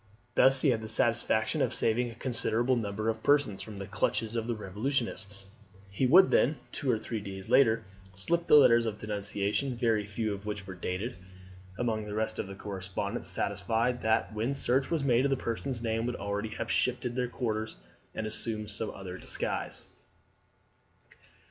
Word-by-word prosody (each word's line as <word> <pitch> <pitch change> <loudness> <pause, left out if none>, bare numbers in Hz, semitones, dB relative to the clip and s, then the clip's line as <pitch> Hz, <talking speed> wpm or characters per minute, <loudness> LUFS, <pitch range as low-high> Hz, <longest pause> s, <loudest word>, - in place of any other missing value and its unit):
Thus 135 +1 +6
he 145 - +4
had 115 -3 +1
the 110 - -6
satisfaction - - +1
of - - +1
saving 120 +2 +1
a 115 - -10
considerable 120 0 0
number 110 -1 -2
of 110 0 -1
persons 140 -10 +2
from 105 +1 -8
the 100 - -5
clutches 110 +3 -1
of 115 0 -1
the 120 - -1
revolutionists. 105 -1 -3 0.5
He 125 +7 +1
would 185 +8 +7
then, 145 +4 +3
two 140 - -3
or 120 - +3
three 110 +1 -4
days 95 0 -8
later, 115 -3 +5 0.3
slip 170 - 0
the - - +7
letters 120 -5 +7
of 105 -1 -3
denunciation, 105 +4 -2
very 110 -3 +1
few 105 +1 -2
of 100 +1 -8
which 105 -2 -4
were 95 - -7
dated, 95 +7 -4 0.6
among 110 -3 -1
the 105 - -5
rest 110 0 -2
of - - -2
the 100 - -8
correspondence, 95 -2 -4
satisfied 115 +5 0
that 110 0 +1
when 115 +6 -1
search 130 0 +1
was 165 -4 0
made 130 +1 +3
the 135 - +1
persons 120 +1 -3
named 115 0 0
would 125 - -2
already 100 +2 -3
have - - -4
shifted 125 -1 0
their 125 -1 0
quarters 110 -3 -2 0.4
and 110 - -2
assumed 110 0 -3
some 105 +2 -3
other 95 -1 -7
disguise. - - -4
110 Hz, 175 wpm, -30 LUFS, 105-125 Hz, 0.6 s, would